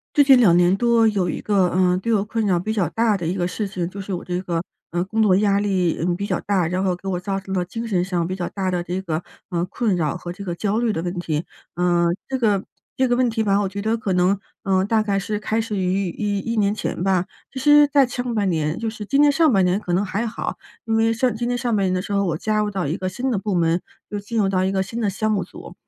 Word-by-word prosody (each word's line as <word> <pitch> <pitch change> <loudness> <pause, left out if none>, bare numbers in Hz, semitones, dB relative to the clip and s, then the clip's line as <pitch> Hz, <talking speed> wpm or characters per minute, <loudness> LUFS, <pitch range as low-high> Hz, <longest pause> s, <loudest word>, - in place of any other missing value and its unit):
最 290 - +7
近 270 -2 +7
2 190 -8 +5
年 175 +2 +4
多 235 0 +3
有 195 -4 0
一 - - -3
个， 195 -4 +2
嗯， 180 -1 +3
对 230 +5 0
我 200 -2 +1
困 220 0 -2
扰 185 -3 +3
比 215 +5 -2
较 195 -7 0
大 225 +1 +2
的 175 -4 -4
一 175 - -1
个 175 -2 -1
事 205 +3 -3
情， 185 -3 -4
就 200 - -8
是 195 0 -5
我 175 - -4
这 180 0 -2
个， 170 -3 -2 0.3
呃， 175 +1 0
工 215 +4 -2
作 210 -4 +5
压 200 +1 +3
力， 190 -4 0
嗯， 175 +2 +1
比 200 +3 -4
较 - - -1
大， 190 -5 +1
然 185 +2 -1
后 185 -2 +1
给 185 +2 -8
我 180 -2 -1
造 195 +2 -3
成 190 0 -8
了 185 -2 0
精 230 +6 -6
神 180 -4 +1
上 175 -2 -1
比 185 - -3
较 175 -2 -3
大 190 -2 -2
的， 180 -1 -1
这 180 +2 -3
个， 160 -4 -2 0.3
呃， 170 -1 0
困 210 +1 -1
扰 155 -3 -1
和 175 -1 -6
这 200 +2 -9
个 175 - -3
焦 205 +4 -1
虑 235 -2 +1
的 165 - -3
问 175 +1 -4
题。 160 -2 -2 0.3
嗯， 175 -1 +2 0.2
这 265 - -1
个 205 -5 +1 0.3
这 260 0 +2
个 245 - +2
问 255 0 +2
题 225 -1 -1
吧， 200 -2 +2
我 200 - 0
觉 200 +1 -5
得 220 +2 +1
可 215 -4 -2
能， 180 +2 +2 0.2
嗯， 190 -2 +1
大 220 0 +2
概 200 -2 0
是 210 +2 -3
开 220 +1 0
始 220 -2 -3
于 185 0 0
1 205 +3 -2
1 230 +4 -3
年 200 -1 +3
前 210 - -3
吧。 185 -1 +1 0.3
其 265 - -5
实 295 +2 +6
在 280 -2 +4
上 245 -1 -3
半 205 -2 +1
年 155 -2 -1
就 230 - -2
是 220 -1 -6
今 275 +7 +1
年 295 0 +6
上 315 -1 +4
半 195 -3 +4
年 180 +3 +1
可 180 - -4
能 190 +3 +2
还 205 +3 -2
好， 225 - -4 0.3
因 225 - -1
为 225 0 +3
上 240 +1 +1
今 240 +2 -2
年 245 0 0
上 240 -2 -1
半 200 -2 +2
年 185 - 0
的 185 - 0
时 205 - -5
候， 200 0 +2
我 170 -4 -1
加 215 +5 0
入 210 0 0
到 190 -5 -2
一 155 +5 -1
个 185 -2 -3
新 250 +8 -2
的 215 - +1
部 205 +1 -3
门， 170 -1 +2 0.3
就 205 - -4
进 215 +3 -4
入 200 -3 +3
到 185 -1 +1
一 190 - +1
个 195 0 0
新 215 +5 -3
的 210 -3 +1
项 215 +3 -2
目 205 - 0
组。 - - -10
195 Hz, 310 characters per minute, -22 LUFS, 180-220 Hz, 0.3 s, 最